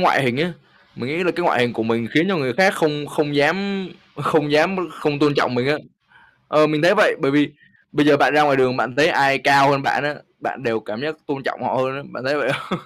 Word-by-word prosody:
ngoại 175 -6 +3
hình 120 -2 0
á 170 +4 -1 0.4
mình 120 - -6
nghĩ 175 +4 -2
là 165 - +2
cái 170 +1 -4
ngoại 120 -7 +2
hình 120 -1 +1
của 110 - -3
mình 115 0 -2
khiến 160 +4 +3
cho 195 - 0
người 130 -6 -2
khác 190 - +3
không 150 -3 -1
không 145 -1 -3
dám 190 +5 0 0.3
không 150 0 0
dám 165 +6 +3 0.2
không 150 -3 -3
tôn 150 -2 +2
trọng 125 - 0
mình 120 +2 -1
á. 150 - +2 0.7
Ờ, 155 +1 +4
mình 150 +1 -1
thấy 180 +4 +5
vậy, 215 - +4
bởi 135 - +1
vì 145 +1 +2 0.4
bây 150 0 +2
giờ 145 -1 +6
bạn 145 - +3
ra 150 - +5
ngoài 140 -2 +3
đường 130 -1 +1
bạn 120 +1 -3
thấy 145 - +4
ai 135 -1 +3
cao 140 0 +5
hơn 140 -1 +1
bạn 145 - 0
á, 150 - -2 0.3
bạn 125 - -6
đều 115 -2 -2
cảm 105 +1 -8
giác 155 +1 -3
tôn 140 -2 -5
trọng 125 - -5
họ 125 - -2
hơn 130 +1 -1
á, 140 - -8
bạn 120 - -9
thấy 140 +3 0
vậy - - -1
không? - - -6
145 Hz, 265 wpm, -20 LUFS, 130-155 Hz, 0.7 s, giờ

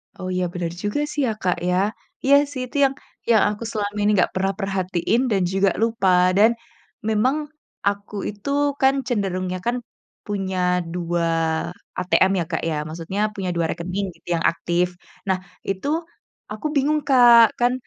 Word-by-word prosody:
Oh 185 - -6
iya 180 0 0
bener 175 -2 -3
juga 205 +7 -1
sih 295 - -1
ya - - +1
Kak, 180 -1 +1
ya 180 - +2 0.5
iya 275 +1 +6 0.2
sih 260 -3 -4
itu 250 - -17
yang 270 - +1 0.4
yang 220 - +5
aku 210 +2 -6
selama 205 -1 -3
ini 205 +1 +3
nggak 180 - +3
pernah 195 +1 0
perhatiin 195 +3 0
dan 195 -2 +2
juga 195 0 +3
lupa 185 -5 +3
dan, 220 +3 +6 0.6
memang, 220 +6 +2 0.5
aku 200 +1 -2
itu 205 +5 -7 0.3
kan 265 0 +5
cenderungnya 185 -5 -1
kan, 240 +1 +1 0.5
punya 195 -3 -3 0.4
2 175 -1 -1 0.7
ATM 185 +1 +3
ya 170 - -1
Kak, 160 - -1
ya 155 - -1
maksudnya 165 +5 -5 0.2
punya 190 -2 -3
2 170 -1 +1
rekening 185 +4 -3
gitu - - -28
yang 165 - -2
aktif 175 +1 0 0.4
nah 190 - +2 0.3
itu, 195 +6 -2 0.6
aku 215 +7 -7
bingung 295 +2 +2
Kak, 240 -4 +8 0.2
kan, 245 +1 +3
195 Hz, 160 wpm, -22 LUFS, 180-230 Hz, 0.7 s, Kak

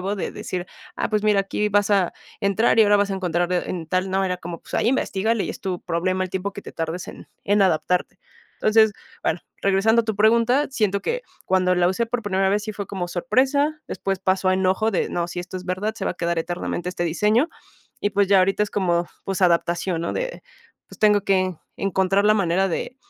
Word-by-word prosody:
Nuevo 195 +3 -2
de - - -3
decir, 180 -1 -5 0.3
ah, - - -2
pues, 210 -1 +1
mira 210 -2 +4
aquí 210 +2 -1
vas 205 +1 +2
a 195 -4 +3 0.3
entrar 220 +3 +2
y 225 - +9
ahora 205 0 +5
vas 200 0 +1
a - - -1
encontrar, 175 -1 -1
eh, 180 - +1
en 170 -3 -4
tal 185 +2 -1
no, 195 0 +1
era 180 -1 -2
como, 170 -2 -7
pues, - - -10
ahí - - +2
investígale, 225 -4 0
y - - -3
es - - -9
tu 185 -4 -3
problema 185 +2 -1
el 185 - -7
tiempo 190 +1 -3
que 200 - -8
te - - -10
tardes 165 +2 -4
en - - -10 0.2
en 205 +1 +2
adaptarte. 180 0 +1 0.4
Entonces, 220 0 +4 0.3
bueno, 170 - 0 0.2
regresando 200 +4 +3
a - - -13
tu 220 -2 -2
pregunta, 235 +6 +4
siento 205 -6 0
que, - - -2 0.2
cuando 185 -1 +3
la 175 0 +3
usé 230 +5 0
por 235 0 -2
primera 190 -2 +1
vez 205 +1 0
sí 215 - -4
fue 200 -1 -5
como 180 -3 -4
sorpresa, 275 - +1
después 195 -1 -3
pasó 190 0 +1
a 185 - +3
enojo 190 +4 +1
de - - 0
no, 170 0 -2
sí, 175 - -6
esto 180 +1 -7
es 180 - -11
verdad, 200 +4 -2
se - - -5
va - - 0
a - - -20
quedar 170 -1 -1
eternamente 175 +1 -3
este 175 -1 -3
diseño, 210 - +2 0.5
y 205 - 0
pues, 200 -1 +2
ya 200 -1 +6
ahorita 195 +2 +2
es 210 - -9
como, 175 -3 +1 0.2
pues 195 0 -2
adaptación, 170 0 +1
¿no? 170 - -2
De, - - -4 0.5
pues, - - -14
tengo 210 -2 +4
que, 185 -3 +1 0.2
encontrar 195 +1 +1
la 215 - +5
manera 190 -1 +1
de 250 +9 -4
195 Hz, 230 wpm, -23 LUFS, 180-210 Hz, 0.5 s, y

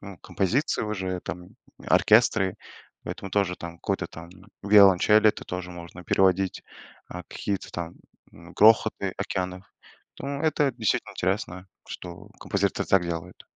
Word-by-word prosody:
ну, 100 -3 -10
композиции 115 - -1
уже, 95 -4 -3
там, 90 +2 -7 0.4
оркестры. 105 -4 +4 0.5
Поэтому 95 - -6
тоже, 100 -3 0
там, 85 -1 -8
какой-то - - -2
там 85 +1 -11 0.3
виолончель 105 +1 +6
это 105 - +2
тоже 90 0 -6
можно 85 0 -10
переводить, 95 +1 +2 0.5
а, 90 0 -7
какие-то 100 -2 -4
там, 85 -1 -5 0.4
м, 85 +1 -14
грохоты 105 -2 +4
океанов. 95 -1 -4 0.6
Ну, 140 +1 -4
это 150 -4 +2
действительно 115 -3 -1
интересно, 90 +1 -2 0.2
что 90 +3 -9
композиторы 100 -1 -1
так 95 -2 +4
делают. 85 +1 -6
95 Hz, 130 wpm, -26 LUFS, 90-105 Hz, 0.6 s, виолончель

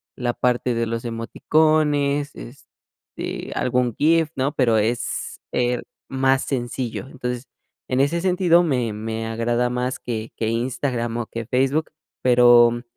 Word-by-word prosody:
la 120 -2 -1
parte 125 0 0
de 115 0 0
los 115 0 -3
emoticones, 145 +4 +1
este, 130 +4 -9
algún 125 -2 +1
GIF, 160 +1 +3
¿no?, 135 +2 0
pero 115 -4 +3
es, 115 +3 -2
eh, 125 0 0 0.3
más 135 0 +2
sencillo. 125 -1 -3
Entonces, 125 -2 -4 0.5
en 130 +1 +1
ese 160 +5 +2
sentido 180 -2 +4
me 125 -9 0
me 110 +1 -4
agrada 120 +2 0
más 125 +1 -2
que 115 -2 -5
que 110 - -1
Instagram 120 0 -2
o 120 - -2
que 115 -1 -6
Facebook, 135 +5 +1 0.3
pero, 120 -1 +5
125 Hz, 135 wpm, -22 LUFS, 120-140 Hz, 0.5 s, pero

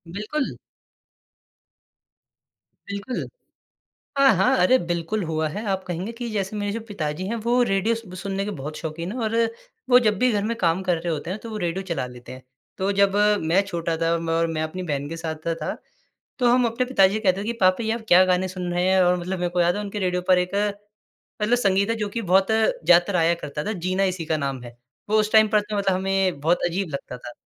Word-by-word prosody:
बिल्कुल। 240 +8 -3 2.3
बिल्कुल 200 +6 -4 0.9
हाँ, 275 -3 +6
हाँ, 190 - +3
अरे 185 +9 +5
बिल्कुल 175 +4 -2
हुआ 160 -1 -1
है। 205 +7 -5
आप 190 -1 -1
कहेंगे 180 +6 -4
कि 235 0 -6
जैसे 200 0 -2
मेरे 205 -1 -2
जो 230 - -3
पिताजी 160 -4 -4
हैं, 230 - -2
वो 235 +2 +1
रेडियो 195 +4 +1
स 220 -5 -9
सुनने 195 0 -2
के 210 - -3
बहुत 150 +3 -6
शौकीन 165 +3 -5
हैं 250 - -5
और 220 0 -1 0.5
वो 250 0 +8
जब 215 -4 +1
भी 250 0 +3
घर 205 -2 0
में 230 +2 -1
काम 170 -2 +1
कर 180 -2 +1
रहे 170 0 -2
होते 155 +3 -5
हैं, 195 - -4
तो 230 - -9
वो 215 - -5
रेडियो 175 +3 -2
चला 165 -8 -2
लेते 125 0 -12
हैं। 130 - -10 0.4
तो 190 +1 0
जब 200 0 +2 0.3
मैं 170 +5 +3
छोटा 170 -3 -2
था 165 0 +1
और 170 - 0 0.3
म - - -4
मैं 155 - -2
अपनी 180 +4 -5
बहन 145 -3 -3
के 165 - -5
साथ 160 -1 -4
सा 165 - +1
था - - -2 0.6
तो 245 - +3
हम 250 0 +4
अपने 235 +2 0
पिताजी 195 -7 +4
से 215 - -1
कहते 195 -2 +1
थे - - -4
कि 235 - -1
पापा 185 +4 +3
जी 220 - -2
आप 230 +1 -2
क्या 180 -1 +7
गाने 185 0 +1
सुन 180 -1 -5
रहे 175 0 +1
हैं? 190 0 +4
और 180 0 +3
मतलब 180 +1 -4
मेरे 175 0 0
को 175 0 +1
याद 175 +2 +2
है 210 - -2
उनके 205 0 -5
रेडियो 180 -2 0
पर 185 - +6
एक 180 0 -2 0.9
मतलब 220 +3 +3
संगीत 200 -2 +2
है 230 - +1
जो 210 -2 -2
कि 230 +3 -3
बहुत 190 -1 +3
ज़्यादा 180 -4 +3
आया 165 +1 +3
करता 150 -2 -5
था, 215 - -2
जीना 185 +1 -1
इसी 185 -4 -1
का 160 -1 0
नाम 135 -3 -3
है। 120 0 -11 0.3
वो 215 +1 +4
उस 215 0 0
टाइम 220 -1 +6
पर 215 0 +3
तो 210 0 -4
मतलब 195 -2 +1
हमें 190 -3 0
बहुत 165 +5 +2
अजीब 175 +1 -2
लगता 130 -2 -6
था। 120 - -9
190 Hz, 235 wpm, -23 LUFS, 170-210 Hz, 2.3 s, वो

